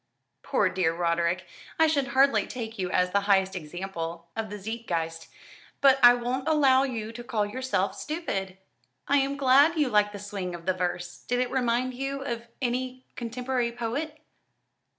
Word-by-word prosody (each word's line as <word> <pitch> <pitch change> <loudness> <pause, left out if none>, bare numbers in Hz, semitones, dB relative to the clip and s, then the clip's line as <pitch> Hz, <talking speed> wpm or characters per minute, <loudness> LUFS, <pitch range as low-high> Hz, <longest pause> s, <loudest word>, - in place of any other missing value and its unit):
"Poor 230 -8 +1
dear 180 -3 +1
Roderick, 170 +1 0 0.3
I 320 - +5
should 290 -4 +1
hardly 275 +1 +3
take 225 -3 -6
you 180 -1 -1
as 180 0 +1
the 200 - +3
highest 190 -1 +3
example 170 0 -6
of 225 -1 -3
the 210 - -6
Zeitgeist; 175 -7 -4 0.5
but 270 -1 +5
I 245 0 +9
won't 250 +3 -3
allow 275 -4 +5
you 230 -5 -3
to 240 +1 -8
call 220 -4 0
yourself 205 -3 -1
stupid. 195 - -4 0.5
I'm 280 0 +2
glad 280 +5 +5
you 295 -4 +2
like 210 -2 +3
the 205 - -7
swing 195 -3 -5
of 170 -1 -11
the 185 - +2
verse. 175 -1 -3
Did 245 0 +1
it 250 -1 0
remind 250 0 0
you 270 +2 -4
of 235 -3 -4 0.2
any 255 +1 -2
contemporary 245 +1 -2
poet?" 265 +7 -4
235 Hz, 165 wpm, -27 LUFS, 190-260 Hz, 0.5 s, I